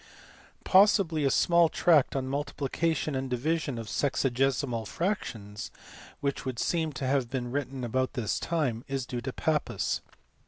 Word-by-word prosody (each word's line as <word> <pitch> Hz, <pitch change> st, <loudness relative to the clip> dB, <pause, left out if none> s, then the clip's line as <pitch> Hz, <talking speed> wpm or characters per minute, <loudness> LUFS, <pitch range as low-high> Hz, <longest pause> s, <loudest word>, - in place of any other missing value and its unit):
Possibly 185 Hz, -6 st, +4 dB
a -, -, +4 dB
small 170 Hz, +4 st, +4 dB
tract 155 Hz, -7 st, +3 dB
on 135 Hz, -1 st, -1 dB
multiplication 145 Hz, +2 st, -1 dB
and 130 Hz, 0 st, -2 dB
division 145 Hz, +2 st, -1 dB
of 115 Hz, -, -5 dB
sexagesimal 130 Hz, -2 st, 0 dB
fractions, 115 Hz, -, -3 dB, 0.5 s
which 140 Hz, -1 st, -1 dB
would 130 Hz, -3 st, -4 dB
seem 160 Hz, +4 st, 0 dB
to 130 Hz, +1 st, -4 dB
have 130 Hz, -2 st, +1 dB
been 125 Hz, -2 st, -3 dB
written 135 Hz, -1 st, -3 dB
about 130 Hz, +2 st, 0 dB
this 115 Hz, -5 st, -1 dB
time, 135 Hz, -9 st, -1 dB
is 135 Hz, -2 st, -2 dB
due 125 Hz, -2 st, -4 dB
to 130 Hz, -, -4 dB
Pappus. 155 Hz, +3 st, -1 dB
135 Hz, 145 wpm, -29 LUFS, 125-155 Hz, 0.5 s, Possibly